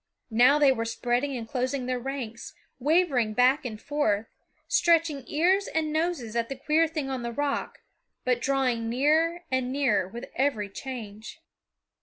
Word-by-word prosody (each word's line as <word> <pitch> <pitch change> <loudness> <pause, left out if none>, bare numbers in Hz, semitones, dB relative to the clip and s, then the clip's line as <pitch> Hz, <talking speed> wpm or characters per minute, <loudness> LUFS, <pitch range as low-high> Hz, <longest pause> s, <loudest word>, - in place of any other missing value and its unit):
Now 250 +6 +5
they 290 -2 +5
were 230 -3 -1
spreading 245 +4 -1
and 230 -2 -6
closing 255 +1 -2
their 250 0 -1
ranks, 245 -3 -6 0.2
wavering 275 -7 +2
back 260 +4 +3
and 215 -3 -5
forth, 225 -7 0 0.4
stretching 330 -7 +2
ears 370 +6 +2
and 310 -1 -1
noses 310 -9 -1
at 230 -1 0
the 270 - -4
queer 310 +5 +2
thing 305 -3 -4
on 260 -2 -3
the 235 0 -4
rock, 285 +3 -3 0.4
but 250 -1 +1
drawing 250 -4 0
nearer 315 +7 +2
and 260 -1 0
nearer 260 -9 +1
with 235 +5 -9
every 240 -7 0
change. 220 -3 -8
260 Hz, 155 wpm, -27 LUFS, 235-300 Hz, 0.4 s, Now